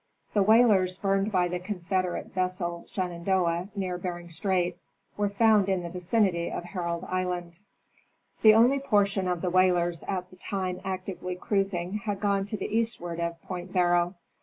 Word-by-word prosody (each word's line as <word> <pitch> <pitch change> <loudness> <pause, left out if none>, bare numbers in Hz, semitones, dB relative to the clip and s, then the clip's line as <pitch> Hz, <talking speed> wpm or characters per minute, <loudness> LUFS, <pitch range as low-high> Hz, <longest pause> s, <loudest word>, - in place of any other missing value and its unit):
The 205 - +3
whalers 200 -4 +4
burned 195 +1 0
by 180 -3 +2
the 180 0 -3
Confederate 185 -1 -3
vessel 180 -2 -2
Shenandoah 180 -1 -1
near 185 -3 -2
Bering 175 -1 -5
strait 180 +1 0 0.4
were 205 -1 0
found 210 -1 +4
in 190 -2 0
the 170 - -6
vicinity 180 -1 +1
of - - -4
Herald 175 -2 -3
island. 180 -2 -3 0.8
The 215 -1 +8
only 245 +5 +5
portion 200 -7 +1
of 180 -2 -1
the 180 - -1
whalers 175 -2 +3
at 185 -2 -3
the 185 - -15
time 185 -1 -3
actively 185 -1 -4
cruising 195 0 -1
had 205 -3 -3
gone 200 -1 +1
to 210 +2 -4
the 215 - -3
eastward 195 -7 -1
of 170 0 -2
Point 180 0 -6
Barrow. 175 0 +2
185 Hz, 160 wpm, -27 LUFS, 175-200 Hz, 0.8 s, The